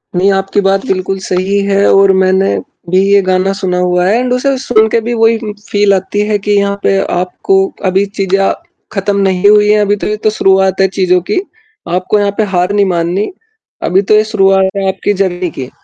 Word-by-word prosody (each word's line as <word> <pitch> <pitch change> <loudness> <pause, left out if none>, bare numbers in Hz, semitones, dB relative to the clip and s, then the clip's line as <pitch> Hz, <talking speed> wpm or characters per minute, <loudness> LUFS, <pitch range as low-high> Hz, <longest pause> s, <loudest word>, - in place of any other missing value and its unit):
नहीं, 190 +3 +2
आपकी 195 +1 0
बात 195 0 0
बिल्कुल 190 0 -2
सही 190 +2 -1
है 200 0 +1
और 195 0 +5
मैंने 190 +1 +1 0.3
भी 185 - +2
ये 200 0 +5
गाना 185 +1 0
सुना 190 -2 -2
हुआ 180 0 +1
है 210 +4 +2
एंड 250 0 -1
उसे 270 +2 0
सुन 230 -4 +2
के 230 - +1
भी 235 +2 -3
वही 225 0 +2 0.3
फील 205 -1 +2
आती 190 +2 -2
है 210 -1 +1
की 205 +1 -3
यहाँ 200 0 0
पे 195 - +2 0.2
आपको 185 +1 -1 0.3
अभी 190 +2 +1
चीज़े 195 0 +1
आ 195 0 +1 0.4
खत्म 200 -1 -2
नहीं 190 0 +2
हुई 210 0 +4
है, 210 - +4
अभी 205 0 +1
तो 205 - -5
ये 210 - -1
तो 215 - +3
शुरुआत 190 -2 +1
है 190 - +4
चीजों 185 -1 +1
की, - - +1 0.5
आपको 185 +4 0
यहाँ 205 0 0
पे 220 - +2
हार 180 +1 +1
नहीं 205 -1 +2
माननी, 180 - -1 0.5
अभी 190 +2 +2
तो 205 +2 +2
ये 215 - +4
शुरुआत 195 -3 +2
है 195 -1 -1
आपकी 195 +2 -2
जर्नी 180 -1 -3
की 130 -1 -5
195 Hz, 210 wpm, -12 LUFS, 185-205 Hz, 0.5 s, और